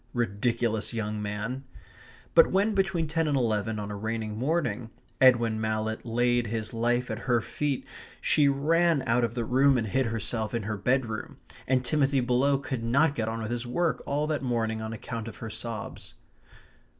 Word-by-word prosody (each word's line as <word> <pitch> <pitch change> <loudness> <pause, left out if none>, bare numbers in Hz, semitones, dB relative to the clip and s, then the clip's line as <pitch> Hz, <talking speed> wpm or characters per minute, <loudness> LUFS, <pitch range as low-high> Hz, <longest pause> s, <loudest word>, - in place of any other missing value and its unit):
Ridiculous 115 0 0
young 105 -1 -2
man! 105 +6 -4 0.7
But - - +7
when, 205 +3 +2
between 190 -4 +1
ten 160 +1 0
and 145 -2 +2
eleven 110 -3 0
on 105 0 -4
a - - -4
rainy 110 +1 -3
morning, 125 -1 -1 0.3
Edwin 120 -4 +5
Mallett 110 0 -2
laid 120 0 +1
his 110 +1 -3
life 120 +1 0
at 110 - -3
her 120 -1 +4
feet 140 +4 -2 0.3
she 145 -2 +3
ran 155 +2 +3
out 120 +2 +2
of 115 0 -1
the 120 -2 -1
room 135 +3 +4
and 115 - 0
hid 130 +4 +1
herself 110 0 -2
in 115 - -1
her 105 +1 -2
bedroom, 115 +1 -1 0.3
and 130 -1 +2
Timothy 140 -1 +2
below 125 +3 +2
could 130 -3 -4
not 140 +6 +3
get 110 -5 -2
on 115 0 -3
with 110 - -4
his 120 0 -3
work 165 +7 0
all 145 +2 0
that 155 -1 -1
morning 115 -3 -1
on 110 0 -4
account 115 0 -5
of 115 - -8
her 115 - -6
sobs. 115 -1 -6
120 Hz, 180 wpm, -28 LUFS, 110-135 Hz, 0.7 s, But